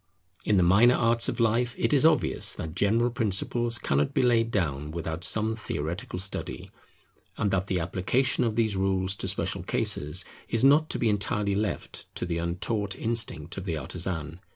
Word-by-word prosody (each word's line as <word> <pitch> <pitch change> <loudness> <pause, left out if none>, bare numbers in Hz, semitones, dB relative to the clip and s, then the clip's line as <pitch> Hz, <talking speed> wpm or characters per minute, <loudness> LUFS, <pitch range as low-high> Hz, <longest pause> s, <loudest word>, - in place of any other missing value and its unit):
In 105 - +2
the 90 - +4
minor 105 +8 +5
arts 115 0 +2
of 120 - -4
life, 120 +1 +1
it - - +1
is 145 +2 +6
obvious 155 -4 +1
that 80 -1 -6
general 115 +6 +2
principles 115 +2 0
cannot 70 -7 0
be - - +3
laid 115 -2 +3
down 75 -9 -1
without 80 +1 -4
some 110 +3 +1
theoretical 90 -4 -4
study; 95 +1 -5 0.7
and 100 - 0
that 95 0 0
the 95 -2 0
application 95 +9 0
of 115 -3 -1
these 110 -3 +1
rules 95 0 0
to - - -4
special - - -1
cases 75 +1 -1 0.2
is 115 +1 0
not 150 +3 +5
to - - -2
be 120 - +1
entirely 105 -1 0
left 100 -1 -3
to - - -3
the 85 -1 -2
untaught 95 +4 -2
instinct 105 -8 -1
of 95 - -5
the 85 -4 -2
artisan. 85 -1 -4
100 Hz, 175 wpm, -27 LUFS, 90-115 Hz, 0.7 s, is